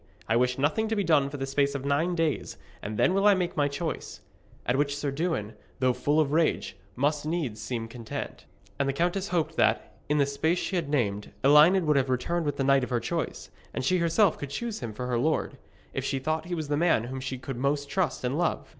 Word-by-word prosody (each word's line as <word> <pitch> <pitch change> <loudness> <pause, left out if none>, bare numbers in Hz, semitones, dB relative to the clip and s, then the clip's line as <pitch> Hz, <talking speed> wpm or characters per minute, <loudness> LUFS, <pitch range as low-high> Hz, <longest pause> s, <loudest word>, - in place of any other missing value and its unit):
I 110 - +2
wish 125 +1 +2
nothing 155 +11 +1
to 220 - -1
be 205 - +1
done 150 -5 +3
for 145 - -6
the 135 - -2
space 140 +1 +1
of 140 -1 -4
nine 160 +6 +1
days, 165 -4 -1 0.2
and 105 +1 -5
then 180 - +3
will 195 +2 +3
I 205 - +7
make 180 -2 -2
my 145 -2 +2
choice.' 155 +3 -5 0.4
At 125 - +1
which 140 +1 0
Sir 145 -1 -2
Dewin, 140 - -2 0.3
though 130 -1 +3
full 145 +5 +1
of 145 -3 +2
rage, 160 +1 +1 0.2
must 145 +3 +1
needs 150 -9 -2
seem 115 +1 -3
content. 115 -1 -7 0.3
And 140 -1 +1
the - - 0
countess 175 +6 0
hoped 170 -4 -1
that, - - +2 0.2
in 150 - +2
the 140 - +4
space 160 +5 0
she 190 - -2
had 165 -5 -1
named, 105 -8 -1
Elined 155 +6 +6
would 150 -2 +3
have 135 -1 +1
returned 160 +6 0
with 145 - -1
the 135 - 0
knight 135 0 +4
of - - -3
her 120 -2 +1
choice, 165 +7 -4 0.2
and - - -2
she 185 +5 +3
herself 170 +3 +3
could 145 - -5
choose 225 +8 -4
him 115 - -5
for 125 +4 -5
her 125 -1 0
lord, 155 +5 0 0.3
if - - -2
she 135 - -1
thought 155 +4 -2
he 175 0 -3
was 155 -3 -4
the 145 - 0
man 165 -8 +3
whom 130 +2 -5
she 130 0 -4
could 130 0 -6
most 140 +2 0
trust 165 -3 -1
and 125 +2 0
love. 175 - -1
145 Hz, 240 wpm, -27 LUFS, 130-165 Hz, 0.4 s, I